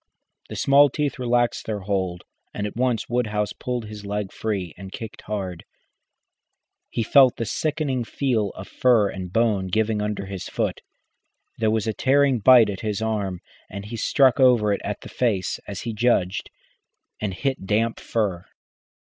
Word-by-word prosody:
The - - -6
small 140 +1 +5
teeth 145 0 -2
relaxed 120 -1 +1
their 105 -2 -3
hold, 95 -3 -2 0.3
and 105 - -2
at 105 - -5
once 125 -1 0
Woodhouse 105 -4 -1
pulled 125 -2 -4
his 105 -1 -9
leg 100 -1 -3
free 100 -6 -3
and 95 -1 -10
kicked 110 +1 -8
hard. 95 -5 -4 1.3
He 115 - -1
felt 130 +2 +6
the 115 - -3
sickening 145 -1 -1
feel 115 -4 0
of 95 - -8
fur 115 -5 +3
and 90 -2 -6
bone 105 -3 +1
giving 110 +2 0
under 105 -1 -2
his 95 -1 -6
boot. - - -2 0.8
There 110 -1 +2
was 110 -1 0
a 110 - -1
tearing 135 +1 +3
bite 115 -1 +7
at 95 - -6
his 105 -2 -2
arm, 105 -5 -2 0.3
and 100 +1 -7
he 115 +3 -6
struck 130 +4 +3
over 120 -6 +5
it - - -3
at 105 0 -4
the - - -10
face, 110 -7 0
as 100 - -5
he 115 - -4
judged, 105 -5 +1 0.7
and 100 -3 -2
hit 130 -5 -2
damp 115 +3 +1
fur. 100 -6 -2
110 Hz, 165 wpm, -24 LUFS, 100-120 Hz, 1.3 s, bite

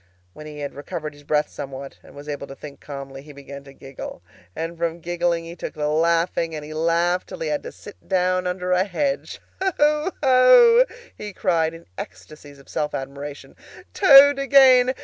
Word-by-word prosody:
When 155 - -11
he 150 -1 -9
had 145 - -5
recovered 150 +2 -6
his 145 - -17
breath 150 +1 0
somewhat, 135 0 -8
and - - -17
was 145 +1 -11
able 145 -1 -5
to 135 - -10
think 145 -1 -11
calmly, 135 -1 -9
he 145 +1 -14
began 140 0 -11
to 135 - -13
giggle, 135 -9 -10 0.3
and 165 +1 -4
from 170 0 -3
giggling 170 0 -1
he 170 +1 -9
took - - -7
to 150 0 -2
laughing, 165 +1 0
and 150 -1 -7
he 155 - -9
laughed 170 +3 0
till - - -8
he 160 - -3
had 150 - -1
to - - -8
sit 205 - -15
down 185 -1 +1
under 180 0 -3
a 180 0 +3
hedge. 275 +9 -3 0.2
"Ho, 300 -3 +1
ho!" 465 - +6 0.3
he 210 -1 -8
cried, 165 -4 0
in 165 - -14
ecstasies 140 +10 -11
of 140 - -19
self 150 0 -3
admiration, 140 +2 -8 0.4
"Toad 285 -5 +7
again! 265 -2 +5
165 Hz, 190 wpm, -22 LUFS, 145-190 Hz, 0.4 s, Toad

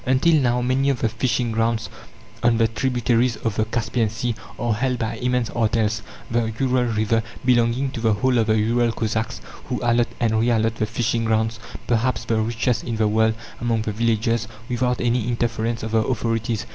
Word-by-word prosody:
Until 130 +6 +3
now, 125 -1 +1
many 130 +2 +2
of 135 -4 -1
the 115 - +2
fishing 120 +1 0
grounds 115 -1 0 0.5
on 120 -1 +3
the 115 0 +4
tributaries 120 +1 +1
of 115 -3 -2
the 110 - +1
Caspian 115 0 -1
Sea 115 +2 -2 0.2
are 120 -1 0
held 125 +3 0
by 115 0 -3
immense 125 -1 0
artels, 110 -1 +1 0.3
the 115 -1 +1
Ural 130 -2 +2
river 115 0 +1 0.2
belonging 125 +2 +2
to 125 - -5
the 110 -1 +3
whole 125 +4 +2
of 110 - +1
the 110 0 +3
Ural 115 +2 +2
Cossacks, 110 0 -2 0.2
who - - -3
allot 120 0 +3
and 110 -2 +2
re 115 +2 +2
allot 115 -1 +1
the 110 - 0
fishing 115 +1 -1
grounds 110 0 0 0.3
perhaps 115 -1 0
the 115 - +1
richest 115 +1 0
in 115 - -3
the 110 -1 +2
world 110 +1 +2 0.2
among 115 -2 0
the 110 - -2
villages, 115 +1 0 0.2
without 125 0 0
any 120 -1 +1
interference 115 -1 -1
of 110 - -4
the 110 - +3
authorities. 115 -2 -1
115 Hz, 190 wpm, -22 LUFS, 110-120 Hz, 0.5 s, the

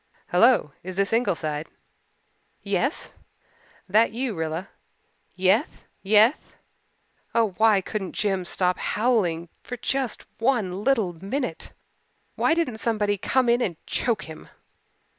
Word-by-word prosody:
"Hello, 180 - +4
is 185 +1 -7
this 195 +2 0
Ingleside?" 160 -9 0 1.0
"Yes." 200 - -1 0.7
"That 215 +4 +4
you, 245 +1 -2
Rilla?" 160 +2 -3 0.7
"Yeth 190 +4 +1 0.2
yeth." 215 +7 +3 0.8
Oh, 230 -2 +3
why 220 -3 +5
couldn't 195 -1 -4
Jims 195 -4 -1
stop 180 -1 0
howling 190 -8 0
for 250 - -7
just 265 0 -2
one 215 -6 0
little 225 -9 +2
minute? 195 - -4 0.6
Why 320 - +2
didn't 270 -10 -1
somebody 210 -3 0
come 255 +6 +1
in 240 +1 +3
and 175 -9 -1
choke 230 -4 -1
him? 160 -1 -11
210 Hz, 115 wpm, -25 LUFS, 180-240 Hz, 1.0 s, why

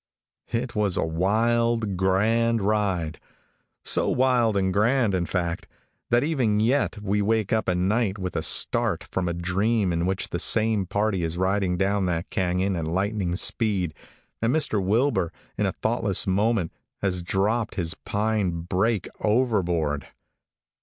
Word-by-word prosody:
It 120 +1 -2
was 105 -4 0
a - - +1
wild, 110 +5 +1
grand 110 +5 +1
ride 95 -6 -1 0.7
so - - +4
wild 125 -5 +2
and 95 -1 0
grand 115 +1 +2
in 90 -2 -1
fact 85 -3 -2 0.4
that 120 +2 +3
even 130 -9 +1
yet 120 +2 +1
we 105 +1 0
wake 110 0 0
up 110 -3 0
at 90 - +1
night 100 +2 0
with 90 -3 -5
a - - 0
start 80 - +2
from 90 -1 -3
a 85 - -1
dream 95 +3 0
in 85 +1 -1
which 95 0 -2
the 85 - -3
same 110 -1 +2
party 105 -1 0
is 85 0 -3
riding 95 -1 0
down 100 +1 +1
that 85 -1 -3
canon 95 +1 0
at 85 -2 -3
lightning 95 +1 -1
speed, 95 -5 0 0.5
and 115 +1 +2
Mr. 130 -9 +1
Wilbur, 100 - +1 0.2
in - - 0
a - - 0
thoughtless - - 0
moment, 100 -1 +1 0.3
has 90 -2 0
dropped 105 +6 -1
his 85 -2 0
pine 100 -5 -1
brake 95 +4 0
overboard! 90 - 0
100 Hz, 150 wpm, -25 LUFS, 90-110 Hz, 0.7 s, so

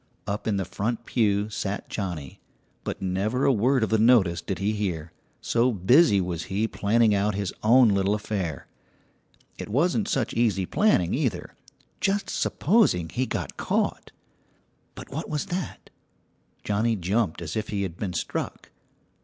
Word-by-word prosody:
Up 105 +1 -3
in 105 -2 +1
the 95 - -1
front 110 +6 -3
pew 105 -3 +1
sat 100 0 -3
Johnnie, 85 -9 -5 0.4
but - - -5
never 100 +8 0
a 135 - +5
word 125 +3 +2
of 110 - -1
the 110 - +3
notice 105 -8 +4
did 90 +2 -4
he 100 +4 0
hear, 90 -7 -3 0.3
so 120 +2 +2
busy 110 - +4
was 90 -3 -3
he 105 +4 -1
planning 110 +1 +2
out 100 0 +1
his 100 -2 -2
own 120 +2 +6
little 100 0 +2
affair. 95 -8 -4 0.9
It - - -6
wasn't 175 - +1
such 130 -5 -1
easy 110 -5 +1
planning 95 - +2
either, 120 - -2 0.5
just 195 +1 0
supposing 150 - +2
he 130 +6 -1
got - - -4
caught! - - -1 0.8
But - - -10
what 155 +4 -5
was 150 +2 -2
that? 185 0 -5 0.7
Johnnie 110 +3 +1
jumped 95 -1 0
as 80 -2 -5
if 110 -1 -3
he 100 -1 -1
had 90 -4 -4
been 95 -3 -3
struck. 85 - -4
105 Hz, 155 wpm, -26 LUFS, 95-120 Hz, 0.9 s, own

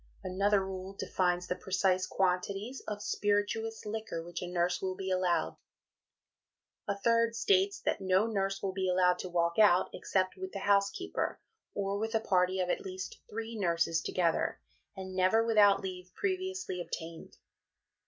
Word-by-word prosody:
Another 195 +1 +2
rule 190 0 -6
defines 180 -1 0
the 180 - -2
precise 185 0 +1
quantities 195 +6 -1
of 210 -1 -4
spirituous 210 +2 -1
liquor 210 -6 -4
which 175 0 -6
a 180 - -4
nurse 175 0 0
will 185 -1 -2
be 190 0 -4
allowed; 185 -2 +1 1.3
a 200 -1 -1
third 230 +2 +2
states 200 -3 +2
that - - -1
"no 190 +2 +3
nurse 195 -3 -1
will 190 -1 -1
be 190 -1 -1
allowed 180 0 +3
to 185 - -5
walk 170 +1 +1
out 195 -4 +5
except 185 -1 0
with 190 0 -6
the 200 - -4
housekeeper, 200 - +1 0.4
or 200 0 -1
with 225 +1 -2
a - - +4
party 185 -3 +2
of 180 - +1
at - - -1
least 185 -1 -6
three 225 +1 -5
nurses 170 -4 +1
together, 170 -3 0 0.4
and 190 -1 -6
never 185 +5 +3
without 210 -3 +5
leave 180 -1 -6
previously 375 - -2
obtained." 165 -1 -7
190 Hz, 155 wpm, -31 LUFS, 180-205 Hz, 1.3 s, out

